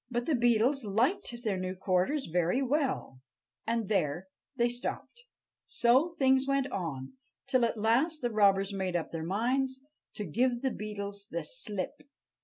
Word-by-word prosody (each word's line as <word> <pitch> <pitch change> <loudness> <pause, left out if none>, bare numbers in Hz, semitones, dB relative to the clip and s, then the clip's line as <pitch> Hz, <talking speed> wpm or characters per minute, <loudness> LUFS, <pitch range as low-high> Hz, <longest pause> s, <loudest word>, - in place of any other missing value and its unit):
But 240 -1 -1
the 320 - +1
Beetles 240 +2 +3
liked 240 - 0
their 210 -5 0
new 185 0 -3
quarters 190 +10 0
very 175 +7 +1
well, 270 - -1 0.5
and 230 -2 0
there 185 -2 0 0.3
they 240 -2 +3
stopped. 245 - -5 0.4
So 255 +7 +3
things 265 -5 +2
went 275 -1 +2
on, 150 - -4 0.3
till 255 -2 +2
at 230 - -2
last 255 +9 +2
the 240 - 0
robbers 200 -2 +3
made 190 -2 -2
up 170 - -2
their 165 - -4
minds 255 +9 0 0.4
to 210 - -4
give 240 - 0
the 265 - +1
Beetles 200 -2 -5
the 170 -1 -3
slip. 205 +1 -5
230 Hz, 155 wpm, -30 LUFS, 190-260 Hz, 0.5 s, Beetles